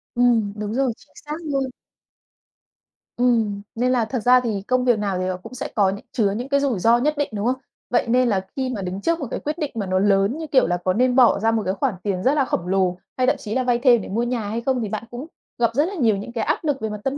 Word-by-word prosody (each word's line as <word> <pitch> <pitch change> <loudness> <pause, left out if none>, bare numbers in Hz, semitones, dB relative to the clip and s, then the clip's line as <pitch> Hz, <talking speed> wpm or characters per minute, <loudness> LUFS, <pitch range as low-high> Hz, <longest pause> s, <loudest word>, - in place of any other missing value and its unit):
Ừm, 235 -4 +3
đúng 210 0 -4
rồi, 260 -1 +1
chính - - -23
xác 300 +1 -4
luôn. 280 -3 -1 1.5
Ừm, 225 -5 +1
nên 250 +2 +1
là 245 -3 +2
thật 250 +3 -3
ra 250 +3 +5
thì 220 -5 -2
công 255 0 +1
việc 240 -4 +3
nào 200 -3 -1
thì 185 - -1
nó 185 -1 -2
cũng 185 - -12
sẽ 260 +2 -4
có 195 -3 +3
nh 200 - -5
chứa 205 -4 +1
những 240 +6 -4
cái 280 0 +3
rủi 270 -8 0
ro 230 +5 +4
nhất 295 +5 +1
định, 290 - 0
đúng 205 0 -2
không? 250 +2 +2 0.3
Vậy 245 - +1
nên 250 +1 +3
là 190 -3 0
khi 260 -1 -1
mà 200 - -4
đứng 185 +1 -4
trước 335 +8 0
một 280 - -4
cái - - -2
quyết 300 +2 -4
định 300 -4 -3
mà 210 -3 -2
nó 185 0 +1
lớn 200 +5 +2
như, 320 -1 -5
kiểu 265 - +3
là, 175 +1 0
có 185 - +2
nên 250 +4 +2
bỏ 255 -2 +5
ra 225 +2 +2
một 225 -1 +1
cái 190 - 0
khoản 255 +3 -1
tiền 190 -3 -2
rất 265 - +3
là 285 -3 +2
khổng 175 -7 -2
lồ, 185 -1 +1 0.2
hay 255 0 +2
thậm - - +4
chí 215 0 -5
là 260 - +1
vay 245 -1 +1
thêm 240 -3 +5
để - - -8
mua 225 +5 0
nhà 240 -4 -2
hay 225 +2 -2
không 255 0 0
thì 215 - -3
bạn 215 +2 -4
cũng 250 +5 -7 0.3
gặp 235 -1 +3
rất 290 +5 +2
là 400 - -5
nhiều 230 - +2
những 200 +4 -7
cái 235 - -1
áp 300 - -1
lực 290 -4 -1
về 220 - -2
mặt 210 0 -5
tâm 270 +1 -1
235 Hz, 295 wpm, -22 LUFS, 205-260 Hz, 1.5 s, ra